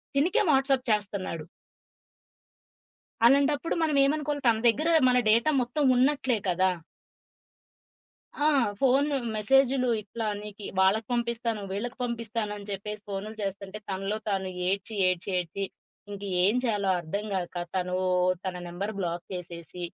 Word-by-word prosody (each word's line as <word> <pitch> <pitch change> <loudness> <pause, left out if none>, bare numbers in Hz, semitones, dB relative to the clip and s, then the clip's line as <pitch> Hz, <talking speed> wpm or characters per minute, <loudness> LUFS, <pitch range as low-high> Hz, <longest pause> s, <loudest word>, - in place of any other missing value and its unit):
తినకే 325 +8 +3
WhatsApp 270 -1 +2
చేస్తన్నాడు. 200 -6 -2 1.8
అలాంటప్పుడు 280 +4 +3
మనం 305 -3 +1
ఏమనుకోవాలి. 290 -1 -1
తన 225 -1 +4
దగ్గర 310 +8 +1 0.2
మన 250 0 +4
డేటా 235 +8 +4
మొత్తం 265 +5 -1
ఉన్నట్లే 260 -3 +2
కదా! 185 +1 +2 1.7
ఆ! 295 - +1 0.3
ఫోను, 275 +2 +3 0.2
మెసేజులు 260 +3 +3
ఇట్లా 220 +2 -5 0.2
నీకి 210 -1 -8
వాళ్ళకి 200 +3 +3
పంపిస్తాను, 235 -2 -1
వీళ్ళకి 240 +6 -4
పంపిస్తాను 230 -3 -3
అని 205 0 -10
చెప్పేసి 210 +1 -5
ఫోనులు 205 +3 -5
చేస్తుంటే, 195 +1 -5
తనలో 195 +2 -2
తాను 190 -2 -1 0.2
ఏడ్చి 200 +3 -2
ఏడ్చి 185 +2 -2
ఏడ్చి 180 +3 -3 0.5
ఇంక 200 0 -7 0.2
ఎం 205 +6 +4
చేయాలో 205 -5 +1
అర్థం 200 +6 -4
గాక 180 -2 -3 0.2
తను 180 0 -1 0.5
తన 185 -1 -3
నంబర్ 195 +5 -4
బ్లాక్ 170 -1 -3
చేసేసి, 175 -1 -7
215 Hz, 125 wpm, -27 LUFS, 195-255 Hz, 1.8 s, తన